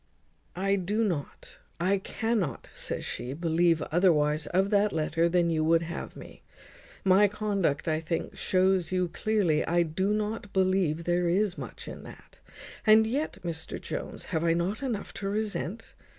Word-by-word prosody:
"I 195 +2 +1
do 205 +5 0
not, 170 -9 -4 0.2
I 190 +3 +2
cannot," 200 - -2
says - - -4
she, 125 +2 -4
"believe 165 +1 +2
otherwise 155 -4 +3
of 190 +3 +1
that 205 0 +3
letter 165 +1 +1
than 170 -1 +2
you 155 -1 +1
would 165 +1 +3
have 170 +1 -6
me. - - -12 0.6
My 195 +2 +6
conduct, 200 -9 -1
I 155 -1 +1
think, 165 +1 -3
shews 185 -2 +1
you 180 -1 +1
clearly 180 -5 +1
I 175 +1 +2
do 185 +5 -1
not 210 -1 -2
believe 185 -4 +2
there 175 +1 +1
is 190 +2 +1
much - - -8
in - - -7
that. - - -14 0.4
And 220 +1 +6
yet, 275 +8 -2
Mr 160 -2 -4
Jones, - - -5
have 160 0 +1
I 165 -1 +3
not 185 +8 -1
enough 240 -7 -3
to 195 - -4
resent? 210 - -3
180 Hz, 160 wpm, -28 LUFS, 165-205 Hz, 0.6 s, My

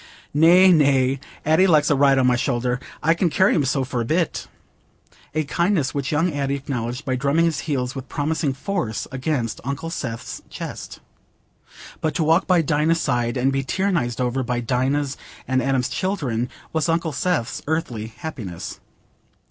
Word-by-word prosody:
"Nay, 175 +5 +7
nay: 135 -4 +3 0.3
Addy 160 +5 +4
likes 155 -4 +4
a - - +4
ride 140 0 +4
on 130 - +3
my 125 -1 +4
shoulder. 125 -1 0 0.2
I 165 +2 +4
can 170 +1 +1
carry 190 +5 +3
him 155 - +2
so 135 +1 +1
for 125 -2 -2
a - - 0
bit." 160 +7 -1 0.9
A 155 - +2
kindness 165 -2 0
which 140 -2 -2
young 160 +3 +1
Addy 140 -1 -1
acknowledged 125 -2 -4
by 130 -2 0
drumming 140 +6 +2
his 160 -4 0
heels 130 -3 -1
with 135 -2 -7
promising 150 -1 -1
force 140 - -3
against 130 -3 -2
Uncle 140 +5 -4
Seth's 115 -8 -5
chest. - - -7 1.0
But 155 -2 -1
to 165 - +1
walk 165 +4 +3
by 180 -3 +4
Dinah's 155 +2 +2
side, 120 -3 0
and 130 +2 +1
be 135 0 0
tyrannized 165 - -1
over 125 +1 0
by 125 -1 -1
Dinah's 130 +4 0 0.3
and 130 0 +1
Adam's 130 -1 +1
children, 130 - -2 0.2
was 160 0 0
Uncle 165 0 +1
Seth's 140 -6 -1
earthly 125 -9 -2
happiness. 110 - -7
140 Hz, 165 wpm, -22 LUFS, 125-160 Hz, 1.0 s, Nay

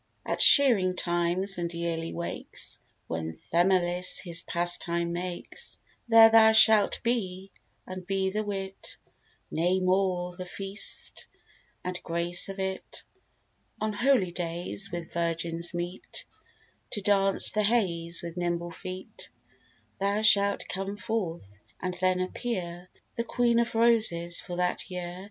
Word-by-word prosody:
At - - -2
shearing 220 -11 +7
times, 175 +2 -1
and 170 -1 -3
yearly 170 -1 -3
wakes, 170 0 -5 0.3
When 80 -1 -4 0.2
Themilis 180 +1 +2
his 170 -2 -1
pastime 170 0 -1
makes, 180 - -5 0.3
There 225 -1 +8
thou 220 0 +7
shalt 220 -2 +6
be; 195 -6 -2 0.3
and 185 0 -7
be 195 -1 0
the 215 +2 -2
wit, 195 -2 -6 0.5
Nay 180 +3 +1
more, 185 -1 0
the 185 - -6
feast, 195 +3 -5 0.6
and 180 0 -4
grace 170 +2 +1
of 195 - -7
it. 190 0 -5 0.8
On 215 0 -2
holydays, 185 -5 -1
when 170 -1 -5
virgins 170 0 -2
meet 175 +1 -5 0.7
To 205 - -2
dance 195 -1 +4
the 215 - +1
heys 175 -7 0
with 170 0 -7
nimble 175 -1 -2
feet, 185 +2 -8 0.7
Thou 200 +2 0
shalt 200 -2 +4
come 195 +2 -4
forth, 170 - -4 0.2
and 185 0 -3
then 185 0 +2
appear 185 -3 -4 0.3
The 235 - 0
Queen 235 0 +1
of 235 -1 -1
Roses 220 -8 +2
for 175 - -7
that 180 +2 -2
year. 180 -1 -6
185 Hz, 125 wpm, -28 LUFS, 175-200 Hz, 0.8 s, There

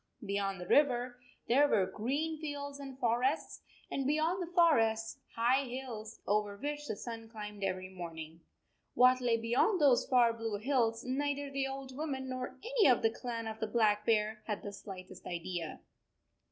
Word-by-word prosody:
Beyond 200 -1 -1
the 180 - -6
river 250 0 +3 0.3
there 280 +5 +5
were 200 -9 +3
green 285 +11 -2
fields 285 -2 -5
and 270 -2 -8
forests, 250 +4 0 0.3
and 270 -1 -1
beyond 315 +5 +1
the 350 -1 -5
forests 225 -11 +3 0.2
high 250 +4 +3
hills 240 -4 -7
over 205 0 0
which 295 +4 -4
the 215 - -2
sun 225 +1 -7
climbed 210 -2 -7
every 185 -1 -1
morning. 165 -3 -8 0.5
What 255 +1 +6
lay 235 -2 +2
beyond 240 - +2
those 275 -5 +4
far 240 -3 +5
blue 225 -2 -3
hills 230 -1 +1
neither 285 +2 -1
the 275 -1 -1
old 270 -1 -6
woman 270 -3 -3
nor 255 -1 -4
any 470 -4 +3
of 250 -3 +4
the 225 - +4
clan 230 -1 -5
of 220 0 -5
the 220 - -1
Black 210 -2 +2
Bear 215 -1 +1
had 210 -2 -3
the 205 - -6
slightest 185 -2 -9
idea. 170 -1 -4
240 Hz, 165 wpm, -33 LUFS, 210-275 Hz, 0.5 s, What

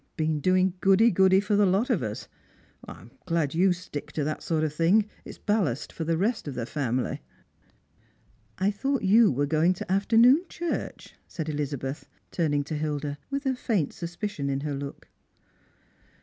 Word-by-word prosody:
•' - - -46
Been 155 -1 0
doing 185 +3 +2
goody 195 +5 +5
goody 190 +1 +5
for 205 +1 0
the 205 -1 +4
lot 200 +8 +1
of 215 - +1
us. 105 -3 -5 0.6
I'm 120 - -11 0.2
glad 165 -4 0
you 180 +4 +3
Btick 180 -5 -4
to 150 - -1
that 155 +2 -3
sort 160 -2 -1
of 155 -2 -1
thing. 175 +7 +3 0.2
It's - - -10
ballast 195 - -1
for 160 - -4
the 165 0 0
rest 215 +1 -1
of 140 - -5
the 120 - -3
family." 130 -2 -2 0.7
" - - -37
I 200 - +3
thought 270 +6 -2
you 215 +3 +5
were 140 +2 0
going 160 +5 +2
to 180 - -6
afternoon 230 - +5
church," 345 -1 -5
said 160 - -5
Ehza 145 -2 -3
beth, 135 +4 -6 0.2
turning 145 -4 0
to 155 +2 -5
Hilda, 145 -1 -3
with 280 0 -3
a 265 - +2
faint 210 - -1
suspicion 175 -3 -4
in 135 0 -1
her 150 0 -3
look. 140 0 -7
170 Hz, 180 wpm, -26 LUFS, 145-205 Hz, 0.7 s, goody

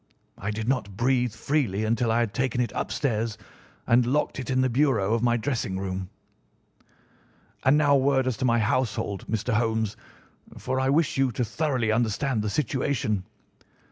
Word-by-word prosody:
I 100 - -3
did 110 +1 -3
not 110 -7 -1
breathe 125 0 +2
freely 115 -4 -1
until 115 +1 +1
I 115 +1 +2
had 110 -4 -1
taken 130 +1 -1
it 120 -4 0
upstairs 115 -5 -1 0.5
and 120 +2 +4
locked 140 +1 0
it 130 - -5
in 130 0 +2
the 130 - +3
bureau 120 -6 +2
of 115 - +1
my 120 0 +2
dressing 115 -6 -2
room. 95 -1 -4 1.5
"And 135 +3 +5
now 145 -2 +4
a - - +6
word 135 -1 +2
as 130 -2 0
to 130 - -1
my 120 -1 +3
household, 105 -3 -1
Mr. 110 +2 -1
Holmes, 110 -1 0 0.6
for 130 +1 -2
I 130 0 +1
wish 150 +1 +2
you 135 -2 +2
to 125 - -1
thoroughly 130 -3 0
understand 115 +2 0
the 105 - -2
situation. 120 -5 -1
120 Hz, 170 wpm, -26 LUFS, 110-130 Hz, 1.5 s, a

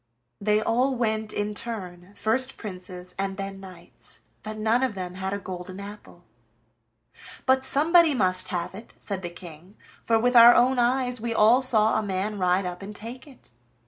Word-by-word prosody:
They 210 +1 +2
all 250 +5 +1
went 220 -2 -1
in 205 0 -3
turn, 195 -4 -6
first 255 +6 0
princes, 180 -3 -8
and 195 0 -2
then 195 0 -6
knights, 185 -3 -13 0.2
but 215 0 -7
none 220 +3 +1
of 255 -5 -1
them 180 -2 -5
had 190 +1 -4
a 200 - -2
golden 185 -1 -8
apple. 205 +1 -11 1.2
"But 260 0 +3
somebody 315 +3 +4
must 185 -4 +2
have 175 0 -4
it," 215 +4 -12
said 195 -2 -5
the 175 - -5
King, 175 +2 -13 0.3
"for 225 - +2
with 245 +2 +1
our 235 0 +9
own 250 +1 +3
eyes 245 0 0
we 230 0 -3
all 225 +5 +5
saw 220 -4 +2
a - - -1
man 200 +1 -3
ride 180 +1 +1
up 180 +1 -5
and 205 +2 -8
take 240 +7 -9
it." 260 - -16
210 Hz, 175 wpm, -25 LUFS, 185-240 Hz, 1.2 s, our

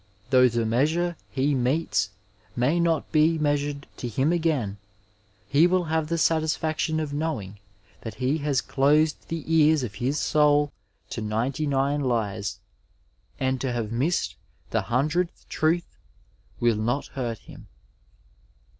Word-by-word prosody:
— 110 +5 -30
^though 125 -2 +6
the 115 0 0
measure 155 +10 +1
he 140 +2 +1
metes 135 +5 +1 0.5
may 135 +8 +2
not 165 -2 +1
be 160 +1 +4
measured 145 -1 -1
to 125 - -4
him 135 +8 +1
again, 145 - 0 0.7
he 145 - +5
will 185 0 +2
have 160 -1 -1
the 170 +1 -1
satisfaction 160 0 +1
of 150 -2 -3
knowing 115 -11 -3 0.4
that 110 -2 -7
he 130 +6 0
has 140 -4 +1
closed 150 +3 +3
the 165 -2 -4
ears 155 -2 +4
of 110 -5 -4
his 135 +4 0
soul 145 -1 +3 0.4
to 115 - -4
ninety 120 +8 -1
nine 140 +1 +1
lies, 110 -6 -1 0.8
and 130 -1 0
to 130 - -1
have 115 -3 -3
missed 140 +10 0 0.4
the - - +1
hundredth 155 +8 -1
truth 165 +2 0 0.6
will 120 -2 +3
not 120 +6 -1
hurt 120 -4 -3
him. - - -14
145 Hz, 140 wpm, -25 LUFS, 120-155 Hz, 0.8 s, ^though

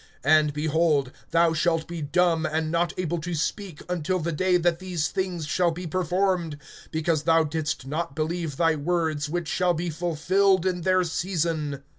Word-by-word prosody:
(20)And, 155 0 +5
behold, 150 -2 +1 0.2
thou 165 0 +3
shalt 165 0 +1
be 170 -1 -6
dumb, 165 +2 +2
and 155 0 -1
not 170 0 +1
able 175 -2 -1
to 170 +2 -4
speak, 170 +1 -3
until 180 +1 -1
the 170 -1 -2
day 180 +3 +2
that 170 -1 +1
these 180 -5 -2
things 180 -4 -2
shall 175 +3 +2
be 175 +2 -5
performed, 180 -1 0 0.3
because 160 -1 0
thou 165 0 +4
didst 150 -3 -3
not 150 +1 -3
believe 160 -2 -2
thy 165 -1 +3
words, 155 -1 -1
which 175 0 -2
shall 180 +2 +1
be 170 +1 -2
fulfilled 180 +4 +2
in 180 -1 0
their 185 +1 +3
season. 160 -5 -2
165 Hz, 170 wpm, -25 LUFS, 155-180 Hz, 0.3 s, 20)And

